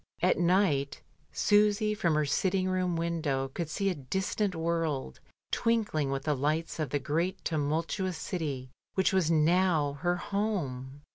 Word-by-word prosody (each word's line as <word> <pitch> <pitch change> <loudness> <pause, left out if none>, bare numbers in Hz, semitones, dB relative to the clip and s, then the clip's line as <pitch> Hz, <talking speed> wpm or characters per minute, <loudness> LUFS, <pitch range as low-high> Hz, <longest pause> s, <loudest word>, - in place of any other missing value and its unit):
At - - +3
night 170 -6 +2 0.3
Susy 210 +1 +3
from 170 -6 +1
her 150 0 +2
sitting 185 +6 +1
room 185 -2 0
window 160 -5 -1
could 160 +4 -4
see 195 +4 0
a - - -1
distant 190 +6 -2
world, 160 - -2 0.3
twinkling 210 -11 +1
with 135 0 -2
the 150 -1 +1
lights 155 +5 -1
of 155 -4 -1
the 145 - 0
great 165 +7 -2
tumultuous 165 +4 -1
city 140 -8 -4 0.2
which 190 0 +2
was 185 -4 +2
now 160 -3 +2
her 175 0 +2
home. 145 -10 -3
165 Hz, 145 wpm, -30 LUFS, 145-190 Hz, 0.3 s, At